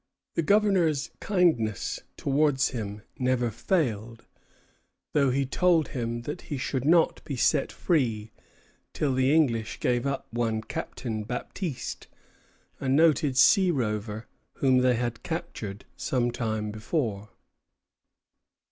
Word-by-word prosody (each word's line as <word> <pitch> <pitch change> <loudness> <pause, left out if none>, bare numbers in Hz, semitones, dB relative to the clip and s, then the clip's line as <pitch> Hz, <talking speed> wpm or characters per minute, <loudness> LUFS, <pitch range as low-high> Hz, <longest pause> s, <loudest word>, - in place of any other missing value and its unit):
The - - +1
governor's 180 -6 +2
kindness 160 - +1 0.2
towards 140 -1 +2
him 105 -4 -5 0.2
never 125 -2 +1
failed, 115 - -1 0.9
though 140 -2 +3
he 135 +2 +1
told 170 +3 +2
him 120 -3 -3
that 150 +7 -5
he 145 - -2
should 130 0 -2
not 165 +2 +3
be 140 - -4
set 135 +3 +2
free 115 - 0 0.6
till 145 -3 0
the 130 +1 +2
English 120 -8 +1
gave 125 +1 +1
up 140 -1 -2
one 115 -2 0
Captain 110 -1 -4
Baptiste, 125 - -5 0.7
a 135 - -2
noted 145 -2 +3
sea 190 +7 +6
rover 110 -6 -2 0.3
whom 130 -2 +3
they 125 -1 +3
had 120 -1 -2
captured 160 - -5
some 120 -2 0
time 110 -3 -2
before. 110 - -2
130 Hz, 120 wpm, -27 LUFS, 115-150 Hz, 0.9 s, sea